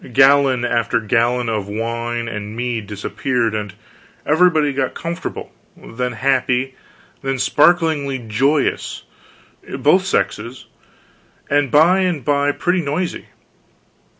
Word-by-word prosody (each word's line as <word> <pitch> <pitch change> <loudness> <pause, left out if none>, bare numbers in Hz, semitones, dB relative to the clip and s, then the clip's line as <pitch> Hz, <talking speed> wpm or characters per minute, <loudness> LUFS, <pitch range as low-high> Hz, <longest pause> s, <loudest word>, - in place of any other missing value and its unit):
Gallon 135 -1 +4
after 115 -1 0
gallon 120 +2 +1
of 105 -3 -2
wine 115 +2 -3
and 105 -1 -6
mead 120 -3 -3
disappeared, 115 +3 -2
and 105 -2 -3 0.5
everybody 155 -2 +3
got 135 -1 -2
comfortable, 170 0 -5 0.3
then 125 +1 -5
happy, 130 +1 0 0.5
then 135 -1 -2
sparklingly 150 -1 +2
joyous 130 +6 -1 0.7
both - - +3
sexes, 120 +2 -2 0.9
and 145 -1 +2
by 165 +7 +5
and 175 -9 -1
by 145 0 +2
pretty 180 +4 0
noisy. 165 +4 -3
130 Hz, 105 wpm, -19 LUFS, 115-145 Hz, 0.9 s, by